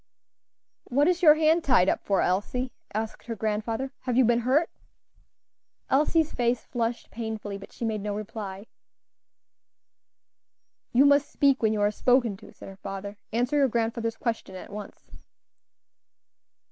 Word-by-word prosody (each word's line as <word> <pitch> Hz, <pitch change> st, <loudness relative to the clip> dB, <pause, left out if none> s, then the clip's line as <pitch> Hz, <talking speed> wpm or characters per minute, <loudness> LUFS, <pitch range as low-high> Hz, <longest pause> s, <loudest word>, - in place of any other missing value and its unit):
"What 285 Hz, +4 st, +2 dB
is 360 Hz, 0 st, +1 dB
your 305 Hz, -3 st, +8 dB
hand 320 Hz, +2 st, +3 dB
tied 240 Hz, -9 st, +4 dB
up -, -, +1 dB
for, 195 Hz, -, +1 dB
Elsie?" 245 Hz, +7 st, -1 dB, 0.2 s
asked 220 Hz, +3 st, -5 dB
her 230 Hz, -, -3 dB
grandfather; 220 Hz, +4 st, -2 dB
"have 250 Hz, -2 st, -2 dB
you 260 Hz, -, +6 dB
been 235 Hz, +1 st, +3 dB
hurt?" 265 Hz, +8 st, +2 dB, 1.2 s
Elsie's 310 Hz, +3 st, +2 dB
face 240 Hz, 0 st, 0 dB
flushed 235 Hz, -1 st, -3 dB
painfully, 220 Hz, -3 st, -5 dB
but 200 Hz, -, -12 dB
she 235 Hz, -, -5 dB
made 215 Hz, -2 st, -2 dB
no 205 Hz, 0 st, -3 dB
reply. 205 Hz, -2 st, -6 dB, 2.3 s
"You 260 Hz, +4 st, +5 dB
must 285 Hz, 0 st, +4 dB
speak 275 Hz, -2 st, +2 dB
when 220 Hz, -2 st, +3 dB
you 215 Hz, -1 st, -1 dB
are 205 Hz, 0 st, +3 dB
spoken 245 Hz, -2 st, +2 dB
to," -, -, -14 dB
said -, -, -13 dB
her 195 Hz, 0 st, -11 dB
father; 195 Hz, +1 st, -6 dB, 0.2 s
"answer 245 Hz, +5 st, +1 dB
your 280 Hz, -2 st, +4 dB
grandfather's 230 Hz, 0 st, -1 dB
question 225 Hz, -5 st, -3 dB
at 185 Hz, -, -9 dB
once." 210 Hz, 0 st, -10 dB
230 Hz, 145 wpm, -27 LUFS, 210-265 Hz, 2.3 s, your